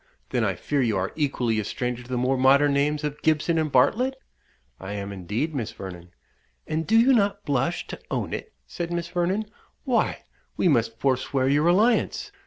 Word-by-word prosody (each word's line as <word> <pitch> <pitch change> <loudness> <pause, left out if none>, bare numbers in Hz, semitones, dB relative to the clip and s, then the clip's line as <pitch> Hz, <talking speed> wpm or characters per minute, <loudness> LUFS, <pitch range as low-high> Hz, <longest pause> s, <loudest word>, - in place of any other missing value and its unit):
then - - +1
I - - 0
fear 145 -2 -1
you 110 -5 +1
are 95 +1 -1
equally 125 -7 0
a - - -1
stranger 125 +3 -3
to 125 - -14
the 125 - -1
more 130 +2 +1
modern 140 +2 +4
names 145 +2 +1
of 150 0 -4
Gibson 160 +1 +2
and 155 -2 -1
Bartlett?" 250 - +3 0.6
"I 95 +2 -6
am, 100 -1 -5
indeed, 105 - -3
Miss 120 -7 -3
Vernon." 90 -2 -9 0.6
"And 160 +1 -2
do 225 +1 +5
you 260 +4 +5
not 200 -3 +1
blush 140 +5 0
to - - -8
own - - -2
it?" 445 - -5
said 170 -1 -5
Miss 170 0 -3
Vernon. 180 +4 0 0.4
"Why, 250 -3 0 0.3
we - - +2
must 115 -7 +2
forswear 130 0 0
your 145 +4 +3
alliance. 225 - +2
145 Hz, 190 wpm, -25 LUFS, 125-175 Hz, 0.6 s, do